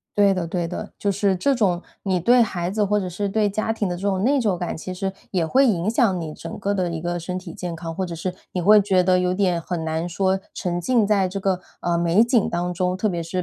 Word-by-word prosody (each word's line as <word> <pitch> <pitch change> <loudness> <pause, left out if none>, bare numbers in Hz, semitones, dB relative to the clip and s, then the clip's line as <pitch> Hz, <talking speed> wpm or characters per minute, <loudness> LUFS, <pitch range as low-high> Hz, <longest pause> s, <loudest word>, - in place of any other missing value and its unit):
对 200 -1 +4
的 175 -3 -2
对 175 0 -1
的， 170 - -6
就 200 - 0
是 195 0 +1
这 275 +10 +2
种 190 -8 +1 0.2
你 190 -2 0
对 240 +8 +5
孩 180 -5 -2
子 210 0 +1
或 210 +1 +1
者 190 -3 -3
是 200 +3 -3
对 210 +1 +1
家 215 +2 -1
庭 210 -3 -2
的 175 - -2
这 - - -10
种 195 -2 0
内 275 +2 +3
疚 205 -6 +1
感， 175 - -3
其 185 +3 -6
实 190 +1 -3 0.2
也 175 -4 0
会 265 +12 +4
影 185 -4 +1
响 220 -6 +2
你 155 -2 -5
整 - - -8
个 200 0 -1
的 185 -3 0
一 165 -1 -4
个 175 +1 -2
身 180 +2 -4
体 180 -3 -9
健 175 -2 -5
康， 165 0 -6
或 190 +2 -2
者 175 - -5
是 180 +2 -3 0.2
你 180 - -1
会 210 +4 +7
觉 190 -2 +3
得 185 0 +3
有 180 0 +1
点 185 -3 +1
很 170 -1 -3
难 160 +2 -2
说 190 +2 0
沉 175 -1 -2
浸 230 +2 +2
在 200 -3 +2
这 195 +2 -4
个， 190 -2 0 0.2
呃， 175 -1 +1
美 170 +6 +4
景 235 -3 +2
当 175 +1 -2
中， 180 +1 0
特 215 +3 0
别 175 -3 -2
是 180 +2 -3
185 Hz, 290 characters per minute, -23 LUFS, 175-205 Hz, 0.2 s, 会